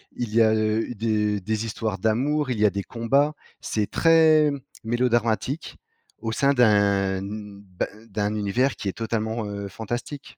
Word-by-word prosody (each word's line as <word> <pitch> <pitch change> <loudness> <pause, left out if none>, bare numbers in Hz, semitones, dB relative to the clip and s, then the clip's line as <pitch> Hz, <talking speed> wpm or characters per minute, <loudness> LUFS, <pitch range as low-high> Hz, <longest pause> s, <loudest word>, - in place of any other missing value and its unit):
Il 120 -3 -4
y 115 - +5
a, 110 -1 +5
heu, 110 +2 0
des 105 -2 0
des 110 +3 -2
histoires 110 -2 -3
d'amour, 130 +8 +1
il 115 - -2
y 105 - +4
a - - +6
des 100 +1 -4
combats. 135 +8 +1 0.3
C'est 105 -2 -2
très 160 -2 +5 0.3
mélodramatique 120 +4 0 0.4
au 115 0 -3
sein 140 +5 +2
d'un, 100 -5 +3
n 100 +1 -7
ben, 95 -2 -4 0.2
d'un 105 +1 -1
univers 110 +6 0
qui - - -5
est 95 - -1
totalement, 110 0 -2
heu, 100 -1 -5
fantastique. 120 +8 -6
110 Hz, 160 wpm, -24 LUFS, 105-125 Hz, 0.4 s, a